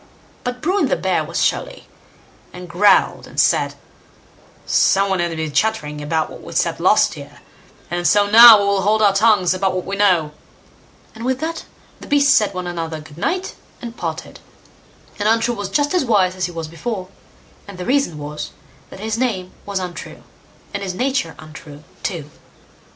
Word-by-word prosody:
But 245 0 -4
Bruin 380 +5 +1
the - - +1
bear - - 0
was - - -6
surly, - - -2 0.6
and 180 0 -10
growled 190 +3 +2
and - - -6
said: - - +2 0.9
"Some 195 +1 +2
one 190 - 0
has 170 -1 -1
been 160 -1 -3
chattering 150 -6 -1
about 155 +2 -1
what - - -11
we - - -10
said - - 0
last - - +3
year, - - -12 0.5
and 175 0 0
so 205 -1 +4
now 230 +1 +10
we 200 - 0
will 200 -1 +1
hold 215 +3 +2
our 200 -2 +5
tongues 195 -3 +3
about 185 0 -1
what 185 - -3
we 195 - -4
know"; 180 -7 +2 0.8
and 225 - -10
with 260 +1 -1
that 325 0 -4 0.3
the - - -12
beasts 285 -1 +4
bade 210 -2 -1
one 180 0 -4
another 165 -2 -4
"Good 155 +1 -14
night", 365 - -2 0.3
and 235 -1 -8
parted, - - -6 0.8
and 205 +1 +1
Untrue 230 +1 +2
was 205 -3 -5
just 290 - 0
as 360 - +2
wise 195 -7 +2
as 185 -1 -2
he - - -9
was 165 -2 -6
before, 185 +3 -5 0.6
and 200 -2 -10
the 180 - -6
reason 275 - 0
was, 150 +1 -6 0.4
that - - -12
his 220 +2 -3
name 195 -8 -2 0.2
was 200 -1 -3
Untrue, 180 -3 -7 0.5
and - - -4
his 190 -2 -4
nature 255 -8 -1
untrue 155 -1 -12 0.2
too. 155 -6 -5
195 Hz, 180 wpm, -19 LUFS, 175-230 Hz, 0.9 s, now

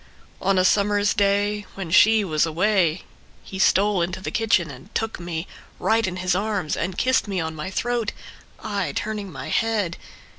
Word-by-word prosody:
On 195 0 +2
a 185 - +3
summer's 205 +1 +3
day 205 0 +1
when 190 -4 -6
she 220 +4 +6
was 155 -4 +1
away 175 0 +1 0.4
He 190 - -8
stole 200 0 +3
into 175 +2 -2
the 190 - -5
kitchen 210 -9 +1
and 140 +9 -13
took 225 -2 -2
me 170 -1 -4 0.3
Right 225 -1 +2
in 185 - -3
his 185 0 0
arms 200 -4 -1
and 180 +2 -3
kissed 260 -3 +2
me 195 -2 -2
on 160 -1 -3
my 155 +4 -5
throat, 235 +2 -1 0.5
I 200 -9 -2
turning 210 -3 -3
my 135 -3 -7
head. 210 -6 0
195 Hz, 175 wpm, -23 LUFS, 175-210 Hz, 0.5 s, she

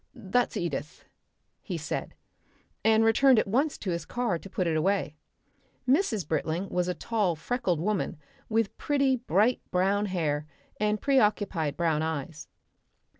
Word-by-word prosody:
"That's 240 +1 0
Edith," 150 -3 -4 0.6
he - - -4
said, - - -4 0.7
and 220 0 +4
returned 255 +3 +5
at - - +3
once 275 +9 +1
to 190 - -3
his 170 -1 -2
car 240 -7 -1
to 195 - -11
put 190 -2 -1
it 165 -2 +1
away. 175 -1 0 0.7
Mrs. 250 - +2
Britling 160 +4 -1
was 180 0 0
a 180 - -1
tall, 205 -3 0
freckled 180 0 -1
woman 200 0 -1 0.3
with 225 -2 0
pretty 275 -3 +2
bright 235 0 +2
brown 195 +3 +1
hair 155 -5 -1 0.3
and 210 0 +1
preoccupied 205 - +1
brown 160 -3 +1
eyes. 155 -1 -4
195 Hz, 140 wpm, -28 LUFS, 165-225 Hz, 0.7 s, returned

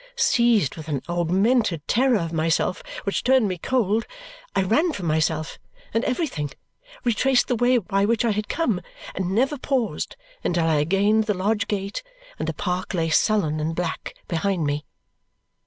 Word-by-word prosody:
Seized 235 - +3
with 155 -1 -8
an 145 -4 -2
augmented 175 - +1
terror 250 0 +3
of 165 -3 -3
myself 165 - +1 0.2
which - - -1
turned 260 -3 +4
me 185 -2 -3
cold, 225 0 +1 0.5
I 195 - +3
ran 305 - +2
from 190 - -5
myself 155 0 0 0.3
and 225 +2 +1
everything, 250 - -1 0.5
retraced 245 +2 +2
the 250 - +1
way 245 +2 +3
by 195 -2 +1
which 230 +2 +1
I 230 - +3
had 210 0 -2
come, 230 - 0 0.3
and 185 -1 -2
never 270 +5 +1
paused 260 -5 -1 0.3
until 170 -2 +1
I 160 -2 +3
had 150 +2 0
gained 205 +3 +3
the 210 -2 0
lodge 205 +4 0
gate, 200 - -3 0.4
and - - -2
the - - -1
park 180 0 -2
lay 165 -2 0
sullen 160 -5 +2
and 160 +2 -2
black 175 -2 -3
behind 175 -1 0
me. 145 +1 -2
200 Hz, 170 wpm, -24 LUFS, 165-235 Hz, 0.5 s, turned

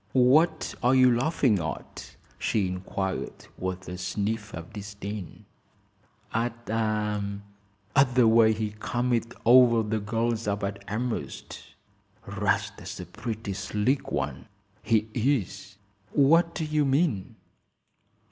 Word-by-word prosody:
"What 135 +7 +4
are 125 +1 +4
you 130 -2 +6
laughing 125 - +2
at?" 80 -1 -6 0.2
she 100 -4 +1
inquired, 95 +1 -4
with 95 0 -4
a 90 0 -6
sniff 105 +3 -2
of 80 +3 -9
disdain. 100 -2 -7 0.9
"At 115 0 -2
at 105 +2 -1
the 125 -3 +6
way 110 0 +6
he 110 -1 -2
come 125 +2 -1
it 115 0 0
over 120 -2 +6
the 110 0 0
gals 115 +2 -1
up 100 0 -1
at 100 0 -4
Elmhurst. 115 +3 -4 0.6
'Rast's - - -2
a 90 - -6
pretty 105 +2 -5
slick 105 +7 -1
one, 70 - -3 0.3
he 110 -1 +2
is!" 115 -5 -1 0.4
"What 165 +4 +4
do 160 - -2
you 150 -1 +1
mean?" 135 - 0
110 Hz, 120 wpm, -27 LUFS, 100-125 Hz, 0.9 s, you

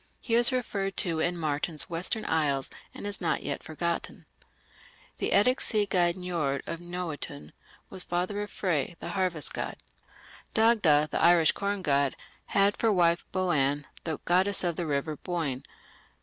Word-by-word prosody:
He 230 - -4
is 240 +2 +6
referred 200 -6 -2
to 170 -5 +2
in 175 +2 0
Martin's 155 0 0
Western 185 +6 -2
Isles, 145 -4 +1 0.2
and - - -8
is 205 -1 -2
not 170 - 0
yet - - -2
forgotten. 170 +2 -4 0.9
The - - 0
Eddic 250 +6 +4
sea 210 -2 +2
god 175 -3 +2
Njord 165 -7 -2
of 165 - -4
Noatun 170 - -5 0.4
was 185 - +1
the - - -22
father 180 +4 -1
of 205 - -5
Frey, 175 -4 -1
the - - -6
harvest 185 -5 +1
god. - - -4 0.8
Dagda, 195 -10 +4
the - - -1
Irish 170 -2 +5
corn 200 -1 -3
god, 140 -3 +1 0.3
had 200 0 +3
for 225 - +2
wife 170 -3 +2
Boann, 145 -6 +1 0.2
the 160 -3 -3
goddess 190 +3 +3
of 175 -2 0
the 170 -1 -3
river 145 +1 -2
Boyne. 155 -8 -3
175 Hz, 160 wpm, -28 LUFS, 155-195 Hz, 0.9 s, is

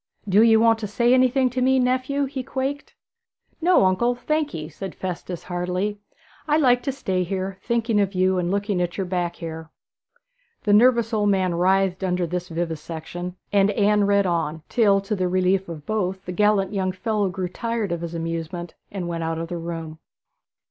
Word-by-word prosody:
'Do 200 +2 +5
ye 225 -1 +6
want 225 0 +4
to 215 - -3
say 235 +4 +2
anything 255 +1 +4
to 255 +1 -2
me, 265 +1 +4
nephew?' 255 +2 +1
he 270 0 -4
quaked. 270 +3 -4 0.7
'No, 350 - +5
uncle, 235 +7 +2
thank 305 +4 -1
ye,' 155 -1 -5
said 175 +4 -8
Festus 180 -1 -5
heartily. 180 +3 -2 0.5
'I 300 0 +3
like 250 -5 +4
to 275 - -2
stay 190 -9 -2
here, 190 +1 -4
thinking 230 -2 +1
of 195 -1 -1
you 185 0 +2
and 175 -1 -1
looking 200 -1 0
at 175 -1 -2
your 195 - -1
back 175 -1 -2
hair.' 160 -1 -7 0.9
The 205 - +2
nervous 235 +1 +4
old 210 -1 +2
man 190 -3 +2
writhed 190 +2 +2
under 180 -1 0
this 180 +2 -4
vivisection, 165 +1 -5 0.2
and 200 0 +4
Anne 205 0 +3
read 200 0 +3
on; 165 -3 -1
till, 200 -4 +3
to 200 +2 -2
the 185 -2 0
relief 185 +1 +1
of 155 -3 -8
both, 190 -3 -2
the 180 - -4
gallant 195 -1 +1
fellow 210 0 0
grew 185 0 -3
tired 230 0 -3
of 170 -1 -2
his 170 0 -5
amusement 165 +1 -4 0.2
and 185 -3 -4
went 170 -1 -3
out 165 0 -2
of 165 0 -4
the 175 - -3
room. 165 -2 -6
190 Hz, 185 wpm, -23 LUFS, 175-225 Hz, 0.9 s, ye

